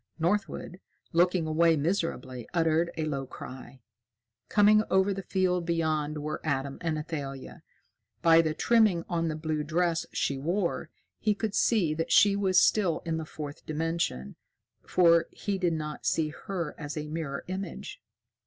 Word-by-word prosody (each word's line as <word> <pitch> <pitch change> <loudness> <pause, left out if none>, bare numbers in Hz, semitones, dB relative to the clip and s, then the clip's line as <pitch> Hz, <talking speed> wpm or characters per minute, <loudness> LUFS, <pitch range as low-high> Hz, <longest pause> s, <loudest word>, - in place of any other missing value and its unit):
Northwood, 180 +1 -1 0.3
looking 175 0 +3
away 160 +1 +3
miserably, 140 - -2
uttered 165 0 +2
a 160 - -1
low 140 -3 -3
cry. 130 +1 -10 0.7
Coming 210 0 +5
over 190 +1 +3
the 195 - -4
field 185 -2 0
beyond 155 -3 -1
were 155 - -4
Adam 140 -2 -2
and 160 -2 -1
Athalia. 140 -4 -6 0.6
By 165 0 +7
the 155 -1 -1
trimming 215 -7 +3
on 165 -1 -1
the 155 - -2
blue 155 -1 -2
dress 165 +2 0
she 140 -1 -1
wore, 170 +5 -1 0.3
he 210 -1 +1
could 215 -1 -3
see 205 -6 +2
that 165 +1 -3
she 205 -1 +6
was 190 -2 +3
still 185 -7 +2
in 165 -1 -1
the 160 - -4
Fourth 150 -1 -8
Dimension, 155 - -2 0.5
for 170 -2 +4
he 200 -2 -3
did 175 -2 +1
not 150 -1 -4
see 155 -2 +1
her 170 -1 -5
as 150 0 -5
a 150 0 -4
mirror 150 -3 -4
image. 190 - -6
165 Hz, 155 wpm, -28 LUFS, 150-180 Hz, 0.7 s, By